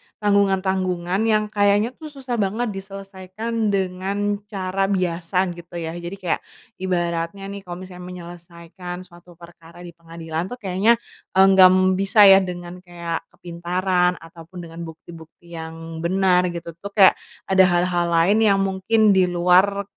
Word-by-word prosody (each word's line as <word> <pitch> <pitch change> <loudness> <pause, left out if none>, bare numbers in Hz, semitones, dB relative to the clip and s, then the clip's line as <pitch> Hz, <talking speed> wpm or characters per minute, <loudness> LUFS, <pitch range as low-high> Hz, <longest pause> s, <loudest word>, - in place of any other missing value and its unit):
tanggungan-tanggungan 190 -2 0
yang 215 -1 +2
kayaknya 205 +2 +2
tuh 310 +4 -11
susah 260 -4 -5
banget 215 +3 -1
diselesaikan 195 +3 -5
dengan 195 +1 -2
cara 195 -1 -2
biasa, 180 -1 0
gitu 175 0 -13
ya. 160 -1 -4
Jadi 175 +2 -7
kayak 180 -4 -2 0.4
ibaratnya 175 0 -2
nih 200 - -6
kalau 175 -2 -8
misalnya 180 -1 -11
menyelesaikan 175 +1 -10
suatu 175 0 -18
perkara 170 0 -15
di 175 - -9
pengadilan 165 0 -6
tuh 245 - -6
kayaknya 200 +2 +2 0.4
enggak 190 -1 +7 0.3
bisa 195 +2 +4
ya 195 -1 +9
dengan 180 -1 -7
kayak 170 -2 -6
kepintaran 180 +1 -1
ataupun 165 +2 -12
dengan 165 +1 -10
bukti-bukti 165 +1 -14
yang 165 0 -8
benar 180 +1 +2
gitu 170 -1 -6
tuh, 200 - -7
kayak 195 -3 +7 0.3
ada 190 0 +4
hal-hal 175 -1 +1
lain 170 +5 +3
yang 210 -3 +4
mungkin 200 +3 +2
di 185 -1 +3
luar, 180 +3 +3
185 Hz, 140 wpm, -21 LUFS, 175-195 Hz, 0.4 s, ya